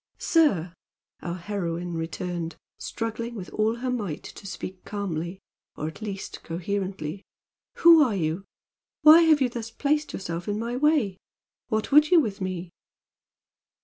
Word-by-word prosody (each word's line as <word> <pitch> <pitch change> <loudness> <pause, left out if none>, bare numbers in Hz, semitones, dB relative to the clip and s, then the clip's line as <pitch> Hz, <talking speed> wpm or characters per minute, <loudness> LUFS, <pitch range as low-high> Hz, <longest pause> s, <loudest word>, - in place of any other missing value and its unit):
"Sir!" 195 - +2 0.5
our 170 0 -4
heroine 175 -2 -3
returned, 165 +1 -4 0.2
struggling 230 +1 -4
with 185 -4 -7
all 215 +1 +1
her 250 +1 -3
might 205 -11 -3
to 200 - -10
speak 185 -1 -7
calmly, 185 -3 -4 0.4
or 150 - -3
at 160 - -8
least 200 -3 -6
coherently 185 0 -4 0.5
"who 335 -2 +8
are 245 -8 +3
you? 165 +1 -1 0.6
Why 310 +2 +10
have 315 -3 +5
you 255 - +3
thus 235 -1 -5
placed 295 +5 0
yourself 170 -2 -5
in 205 0 -1
my 235 +2 -3
way? 260 -9 +2 0.5
What 220 0 -1
would 300 +2 +7
you 355 - +7
with 210 -9 -2
me?" 185 -2 -4
200 Hz, 145 wpm, -26 LUFS, 175-245 Hz, 0.6 s, Why